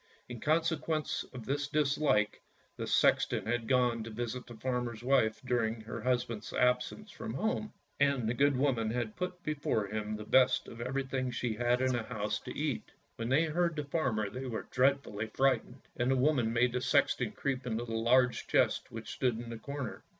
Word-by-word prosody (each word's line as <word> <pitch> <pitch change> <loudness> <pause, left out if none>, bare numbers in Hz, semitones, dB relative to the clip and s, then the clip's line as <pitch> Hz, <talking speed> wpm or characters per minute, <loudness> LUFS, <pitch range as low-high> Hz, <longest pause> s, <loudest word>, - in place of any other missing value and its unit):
In 120 -2 -7
consequence 155 0 0
of 125 -3 -8
this 140 +1 -1
dislike, 140 -7 +1 0.3
the - - -4
sexton - - +3
had 115 0 -1
gone 125 -2 +2
to 115 - -7
visit 120 +3 -4
the 120 - -10
farmer's 120 -1 -3
wife 125 -4 +3
during 115 -3 0
her 110 +1 -6
husband's 115 -4 -1
absence 125 - +1
from 225 -1 -6
home, 215 0 -1 0.3
and 140 -5 +2
the 115 - +1
good 140 +2 +3
woman 125 -5 +1
had 115 -1 -2
put 180 -1 -4
before 145 -8 0
him 105 +1 -3
the 105 - -6
best 130 +3 +4
of 115 - -9
everything 130 0 -2
she 120 -1 -2
had 120 +3 +1
in 130 0 +2
the 120 - 0
house 110 -2 -3
to - - -8
eat. - - -2 0.3
When 115 +1 -3
they 140 +5 +4
heard 170 +1 0
the 150 - -2
farmer 130 -8 0
they 130 +6 -6
were 115 -3 -4
dreadfully 130 -5 +1
frightened, 130 +1 0
and 120 +1 0
the 135 - +4
woman 130 -4 +2
made 120 +1 +2
the 125 - -1
sexton - - +2
creep 130 -2 -2
into 115 0 -1
a 115 -1 -5
large 125 +2 +3
chest - - +2
which - - -7
stood 125 -3 0
in 115 0 -6
a 115 - -7
corner. 140 0 -5
125 Hz, 190 wpm, -32 LUFS, 115-140 Hz, 0.3 s, best